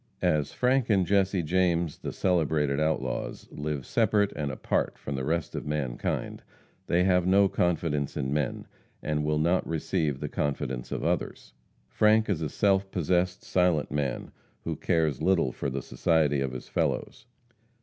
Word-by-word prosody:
As 75 -2 +1
Frank 125 -1 +1
and 95 -4 +3
Jesse 95 -1 +2
James, 85 -1 +1
the - - -5
celebrated 75 -5 +1
outlaws, 80 0 -2
live 75 -3 -4
separate 105 -1 +2
and 75 -1 -2
apart - - -1
from 70 - -6
the 65 -1 -3
rest 80 +3 -1
of - - -5
mankind, 75 -5 -2 0.5
they 90 +1 +3
have 90 -1 +3
no 100 +1 +5
confidence 80 -6 0
in 65 +1 -1
men, 75 -4 -2 0.4
and 75 0 -1
will 75 0 +1
not 85 +4 +1
receive 75 -3 -1
the - - -3
confidence 65 -3 -3
of - - -3
others. - - -2 0.3
Frank 110 - +3
is 85 -5 -1
a 80 - -1
self 95 +3 +1
possessed, 90 0 0
silent 90 -4 +1
man, 75 -3 -2 0.3
who - - -3
cares 80 -5 0
little 90 -8 +2
for 70 - -3
the 65 -1 -4
society 75 -5 +1
of 65 -2 -1
his 65 - -7
fellows. 110 - -2
80 Hz, 160 wpm, -28 LUFS, 75-90 Hz, 0.5 s, no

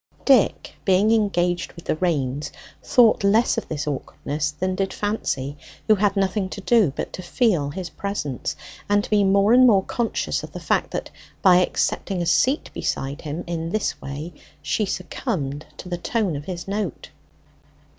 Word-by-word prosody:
Dick, 265 -6 +3
being 195 +3 +3
engaged 180 -5 +1
with 170 - -13
the - - 0
reins, 145 -5 -1 0.3
thought 235 -5 +4
less 215 +4 +4
of - - -11
this 150 -2 -3
awkwardness 150 +1 -3
than 185 +5 -2
did 195 0 -1
Fancy, 145 -10 -2 0.3
who 215 - +7
had 205 0 +2
nothing 195 0 0
to 200 - -7
do 205 - +4
but - - -4
to - - -6
feel 175 - +1
his 175 +4 -6
presence, 200 -10 -3 0.3
and 205 0 +3
to - - -7
be 210 -1 +4
more 200 +3 +4
and 255 +1 +7
more 200 -5 +5
conscious 235 +3 -1
of - - -10
the - - -6
fact, - - 0
that - - -5 0.3
by 185 -2 +7
accepting 185 +1 0
a 175 - -1
seat 260 - +2
beside 140 +3 -3
him 155 +2 -5
in 165 -1 -3
this 215 +4 -2
way 145 +5 -6 0.3
she 215 - 0
succumbed 150 - -3
to - - -9
the 175 -1 -3
tone 205 -4 -1
of 145 +1 -6
his 175 0 -6
note. 200 -5 -4
185 Hz, 175 wpm, -23 LUFS, 155-205 Hz, 0.3 s, who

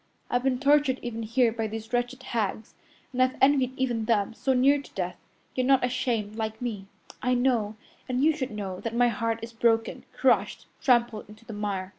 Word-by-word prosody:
I've 245 - +2
been 260 -1 +1
tortured 285 -1 +3
even 235 -2 -4
here 230 +2 +2
by 225 -1 -2
these 225 +2 -7
wretched 245 +2 -1
hags, 215 -1 -3 0.4
and 255 - 0
I've 255 0 +2
envied 265 -2 +3
even 240 -4 0
them, 215 -2 +1
so 265 +3 0
near 275 +3 +4
to - - -16
death, 180 -1 -3 0.4
yet 255 -1 0
not 270 -2 +4
ashamed 230 -4 -1
like 220 -1 -3
me. 215 -6 -4 0.3
I 250 0 +2
know, 240 -4 +1 0.3
and 255 +1 0
you 315 0 +4
should 260 -5 -3
know, 195 -3 -5
that 230 0 -4
my 245 0 +4
heart 230 0 -1
is 230 +1 -7
broken, 225 0 +1
crushed, - - +1 0.2
trampled 240 -5 +2
into 215 +2 -15
the 225 - -8
mire. 200 -3 -3
235 Hz, 195 wpm, -27 LUFS, 220-255 Hz, 0.4 s, near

